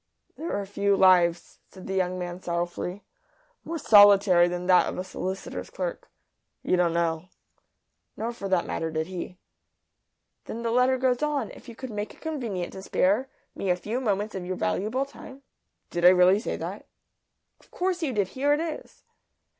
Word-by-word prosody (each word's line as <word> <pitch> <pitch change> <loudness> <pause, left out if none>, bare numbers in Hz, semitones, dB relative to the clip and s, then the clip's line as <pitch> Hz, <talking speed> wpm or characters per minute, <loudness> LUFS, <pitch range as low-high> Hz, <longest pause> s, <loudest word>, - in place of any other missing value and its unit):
"There 325 -8 -3
are 200 - -4
few 200 0 +1
lives," 175 -3 +3
said 185 - -13
the 190 - -4
young 185 -1 0
man, 175 0 -5
sorrowfully, 175 +2 -3 0.6
"more 335 - -4
solitary 200 - +6
than 175 0 -4
that 180 0 +5
of - - -6
a 185 - -2
solicitor's 185 +1 -5
clerk. - - -5 0.5
You - - +2
don't 175 -2 +2
know." 165 -1 0 0.9
Nor, 230 +2 -3
for 200 -4 -6
that 185 -2 +2
matter, 165 - -3
did 160 0 -2
he. 180 0 -7 1.1
"Then 230 +1 -6
the 230 - -1
letter 250 +2 +3
goes 255 0 +1
on: 300 -2 -1
'If - - -13
you 235 - -10
could 260 +1 -7
make 210 0 -5
it - - -22
convenient 235 - -4
to 190 - -8
spare 205 +7 +1 0.2
me 195 - -3
a 180 - +4
few 215 +8 -4
moments 210 -2 -1
of 190 - -5
your 185 +1 -3
valuable 215 - -1
time 275 0 -13 0.2
'" - - -52
"Did 175 - -3
I 180 - +10
really 185 +2 +5
say 225 - -3
that?" - - -7 0.7
"Of - - -25
course 360 -1 -2
you 305 -5 -1
did. 205 -5 0
Here 285 +5 +1
it 295 - +1
is." 325 -2 -6
195 Hz, 185 wpm, -26 LUFS, 180-250 Hz, 1.1 s, I